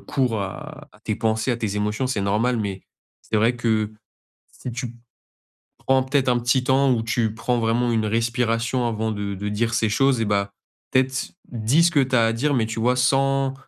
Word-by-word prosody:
cours 125 Hz, -6 st, -1 dB
à 150 Hz, +10 st, -7 dB
à 105 Hz, -, -21 dB
tes 110 Hz, -1 st, -2 dB
pensées, 110 Hz, +3 st, 0 dB
à -, -, -2 dB
tes 110 Hz, -3 st, -3 dB
émotions 105 Hz, +4 st, -1 dB
c'est 125 Hz, -6 st, -1 dB
normal. 110 Hz, +5 st, +1 dB
Mais 100 Hz, -3 st, -4 dB, 0.4 s
c'est 110 Hz, -, -2 dB
vrai 115 Hz, +3 st, +3 dB
que 110 Hz, -3 st, 0 dB, 0.6 s
si 125 Hz, -, -8 dB
tu 120 Hz, 0 st, -5 dB, 0.8 s
prends 130 Hz, 0 st, +2 dB
peut-être 135 Hz, 0 st, +1 dB
un 120 Hz, -1 st, +2 dB
petit 125 Hz, +2 st, +1 dB
temps 135 Hz, +1 st, +3 dB
où 115 Hz, -2 st, -1 dB
tu 115 Hz, -1 st, 0 dB
prends 120 Hz, +2 st, -1 dB
vraiment 120 Hz, +2 st, +1 dB
une 110 Hz, -2 st, +1 dB
respiration 115 Hz, +2 st, 0 dB
avant 110 Hz, -1 st, -2 dB
de 100 Hz, -1 st, -4 dB
de 100 Hz, +2 st, -4 dB
dire 115 Hz, +3 st, -1 dB
ces 110 Hz, -1 st, +1 dB
choses 130 Hz, +2 st, +2 dB
et -, -, +1 dB
bah, 100 Hz, -1 st, 0 dB, 0.4 s
peut-être 130 Hz, 0 st, 0 dB, 0.2 s
dis 120 Hz, +7 st, +2 dB
ce 170 Hz, -, +4 dB
que 150 Hz, -, +3 dB
tu 130 Hz, 0 st, 0 dB
as 115 Hz, -, +4 dB
à 115 Hz, -, +1 dB
dire 145 Hz, +6 st, 0 dB
mais 115 Hz, -3 st, +1 dB
tu 115 Hz, 0 st, -5 dB
vois 125 Hz, +3 st, +2 dB
sans 135 Hz, +1 st, +2 dB
115 Hz, 205 wpm, -23 LUFS, 110-130 Hz, 0.8 s, ce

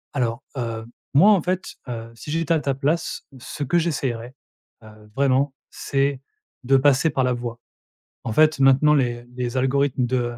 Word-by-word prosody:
Alors, 125 Hz, 0 st, -1 dB
heu, 115 Hz, -2 st, -4 dB, 0.3 s
moi 195 Hz, +9 st, +7 dB
en 195 Hz, -5 st, +4 dB
fait, 185 Hz, +2 st, -3 dB
heu, 115 Hz, -1 st, -6 dB
si 130 Hz, -, -10 dB
j'étais 165 Hz, +1 st, +1 dB
à 160 Hz, -, +2 dB
ta 140 Hz, -1 st, -1 dB
place 150 Hz, +5 st, -2 dB
ce 145 Hz, -, -6 dB
que 170 Hz, +6 st, +2 dB
j'essayerais, 130 Hz, -6 st, -3 dB, 0.5 s
heu, 110 Hz, -1 st, -16 dB
vraiment, 135 Hz, 0 st, +2 dB, 0.2 s
c'est 135 Hz, -1 st, -1 dB, 0.4 s
de 135 Hz, +2 st, +4 dB
passer 145 Hz, +3 st, +3 dB
par 135 Hz, -2 st, 0 dB
la 125 Hz, 0 st, +1 dB
voix. 120 Hz, -1 st, -5 dB, 0.7 s
En 110 Hz, -, -2 dB
fait 155 Hz, +1 st, +4 dB
maintenant 135 Hz, +3 st, +5 dB
les 120 Hz, -4 st, 0 dB
les 125 Hz, 0 st, -3 dB
algorithmes 135 Hz, 0 st, +1 dB
de, 120 Hz, -1 st, -1 dB
135 Hz, 170 wpm, -23 LUFS, 120-145 Hz, 0.7 s, moi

